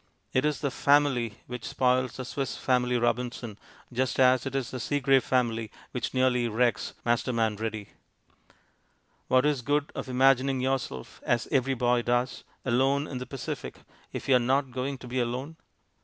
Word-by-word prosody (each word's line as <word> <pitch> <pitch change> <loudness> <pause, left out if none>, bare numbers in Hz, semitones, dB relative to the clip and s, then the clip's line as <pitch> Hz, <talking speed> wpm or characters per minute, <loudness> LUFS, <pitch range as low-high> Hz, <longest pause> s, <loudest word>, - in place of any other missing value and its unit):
It 130 +2 +2
is 150 -4 0
the 140 - 0
"Family" 135 -6 +2
which 125 -1 -7
spoils 125 -1 +1
The 130 - -5
Swiss 135 +1 -3
Family 125 -1 +1
Robinson, 120 -2 -2 0.3
just 130 +2 0
as 130 0 +4
it 135 - -5
is 135 -3 -2
the 130 - -4
Seagrave 135 0 +2
family 115 -4 0 0.2
which - - -3
nearly 125 -2 +2
wrecks 115 0 0
Masterman 115 -2 +1
Ready. 110 -1 -4 1.4
What 130 +2 +4
is 150 -3 +2
the 120 - -11
good 145 +1 +1
of - - -5
imagining 135 +1 +3
yourself 130 - -3
(as 120 0 0
every 135 -1 +2
boy 120 0 +2
does) 120 +2 0 0.2
"Alone 135 +3 +2
in 130 -4 -5
the 125 - -6
Pacific" 135 -3 -6 0.3
if - - -6
you 130 -2 +6
are - - +1
not 130 +2 +1
going 130 +2 -3
to 125 - -11
be 125 +1 -2
alone? 125 +6 -2
125 Hz, 170 wpm, -28 LUFS, 120-135 Hz, 1.4 s, you